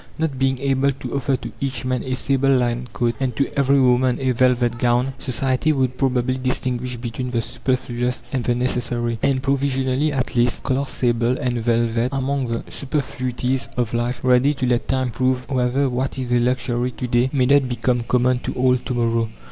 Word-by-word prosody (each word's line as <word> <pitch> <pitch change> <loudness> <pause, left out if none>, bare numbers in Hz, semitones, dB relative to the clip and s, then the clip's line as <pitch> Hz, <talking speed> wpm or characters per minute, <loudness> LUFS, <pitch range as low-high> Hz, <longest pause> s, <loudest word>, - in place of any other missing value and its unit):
Not 155 -5 -2
being 135 0 +2
able 140 0 +2
to 125 -2 -7
offer 135 0 +1
to - - -8
each 130 -3 -2
man 130 -1 0
a 130 - 0
sable 135 +1 +1
lined 120 -1 -1
coat 120 -1 0
and 130 -3 -1
to 140 - +2
every 140 0 +3
woman 125 -1 +3
a 130 -1 +1
velvet 125 -1 +2
gown, 125 +2 +1
society 130 +3 0
would 130 -3 0
probably 130 -1 +1
distinguish 125 -1 -2
between 120 +2 -4
the 120 -1 0
superfluous 125 0 -2
and 130 -3 0
the 120 - +1
necessary, 120 -2 -1
and, 130 -1 +1
provisionally 135 +1 +1
at 130 -3 -2
least 120 0 +1
class 135 0 -1
sable 120 0 +1
and 125 -4 -1
velvet 115 +1 +1
among 135 -1 -1
the 115 0 -3
superfluities 130 -2 -2
of 120 -2 -1
life, 120 +1 -1
ready 130 +3 +4
to 130 - -2
let 125 -1 0
time 130 -2 0
prove 130 +1 0
whether 130 +1 +1
what 130 +1 -2
is 125 -2 -3
a 120 - +4
luxury 125 0 0
to 125 - -6
day 120 +1 +2
may 130 -3 +2
not 135 0 +4
become 120 0 0
common 125 +1 +1
to - - -4
all 125 0 +3
to 125 +1 -5
morrow. 115 -1 +1
125 Hz, 190 wpm, -21 LUFS, 120-130 Hz, -, ready